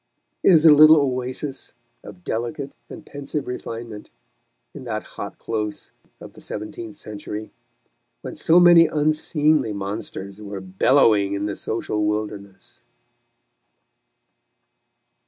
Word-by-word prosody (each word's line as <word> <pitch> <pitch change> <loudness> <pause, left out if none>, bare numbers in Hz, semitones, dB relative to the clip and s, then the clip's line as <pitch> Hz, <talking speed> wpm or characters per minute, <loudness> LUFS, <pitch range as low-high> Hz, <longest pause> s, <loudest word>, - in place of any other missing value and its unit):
It - - +4
is 165 -2 +5
a 155 - +9
little 155 +2 +8
oasis 130 0 -3 0.3
of 95 -3 -12
delicate 130 - -4 0.2
and 160 - -10
pensive 145 +1 -5
refinement 115 -3 -7 0.6
in - - -10
that - - -3
hot - - -8
close 105 -2 -5 0.3
of - - -12
the - - -15
seventeenth 105 +1 -7
century, 105 +1 -7 0.7
when - - -7
so 165 +2 +4
many 175 -2 +7
unseemly 150 -4 +1
monsters 100 0 -6
were 100 -1 -6
bellowing 100 +1 +3
in 100 0 -2
the 105 - -3
social 105 -1 -3
wilderness. 105 -2 -5
115 Hz, 115 wpm, -22 LUFS, 105-150 Hz, 0.7 s, a